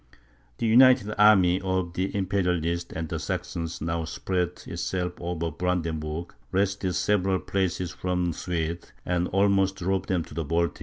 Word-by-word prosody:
The - - -2
united 115 -2 +6
army 95 -4 +6
of 95 -2 -1
the 95 +2 -2
Imperialists 90 -3 0
and 80 0 -4
the - - -3
Saxons 85 -1 -4
now 85 +1 -1
spread 90 +2 -2
itself 90 -1 -2
over 85 -1 -2
Brandenburg, 80 -1 -2 0.2
wrested 95 -1 0
several 95 0 +2
places 90 -3 -1
from 90 +3 -1
the 85 - -1
Swedes, 85 0 -3
and 90 0 0
almost 95 0 +2
drove 95 +1 -1
them 90 -3 0
to - - -13
the 80 +2 -2
Baltic. 85 +3 0
90 Hz, 150 wpm, -26 LUFS, 85-95 Hz, 0.2 s, united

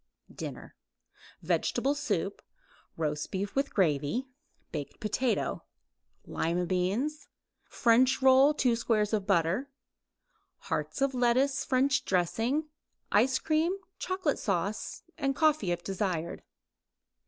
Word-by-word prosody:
DINNER - - -8 0.7
Vegetable 275 - +1
soup; 285 - -2 0.6
roast 150 -2 -2
beef 195 +1 -3
with 275 +1 0
gravy; 165 - +1 0.5
baked 145 -3 -6
potato; 225 +3 -1 0.6
lima 175 +2 -1
beans; 215 - -1 0.4
French 250 +2 +3
roll; 265 +2 +6
2 250 -5 +2
squares 215 -3 +1
butter; 195 - +1 0.9
hearts 275 - -3
of 275 -1 +1
lettuce, 260 +3 +2
French 265 +1 +2
dressing; 225 - 0 0.4
ice 255 +6 +4
cream, 325 +4 +1 0.2
chocolate 370 -6 -1
sauce; 200 +1 -2 0.3
coffee 305 - +2
if 175 0 -2
desired. 185 -4 -2
230 Hz, 95 wpm, -30 LUFS, 185-275 Hz, 0.9 s, roll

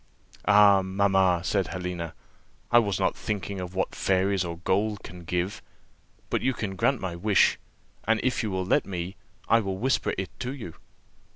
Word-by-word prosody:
"Ah, 100 -1 +7
mamma," 95 -2 +2
said 95 +1 0
Helena, 90 -3 -5 0.6
"I 120 - +8
was 100 -4 0
not - - +1
thinking 100 -2 -4
of 90 +1 -7
what 95 - -1
fairies 95 0 +1
or 85 -1 -5
gold 100 +4 0
can 90 0 -10
give; 90 +4 -2 0.7
but - - +1
you 130 -1 +1
can 100 -3 -4
grant 130 +6 +1
my 90 -3 -4
wish, 100 +2 +3 0.5
and 115 +1 +2
if 130 - +1
you 110 - -2
will 95 -1 -2
let - - +2
me, 90 0 -4 0.3
I 115 - +5
will 95 -3 -3
whisper 130 +6 0
it 95 0 -4
to 125 +3 -3
you." 110 - -8
95 Hz, 175 wpm, -27 LUFS, 90-105 Hz, 0.7 s, I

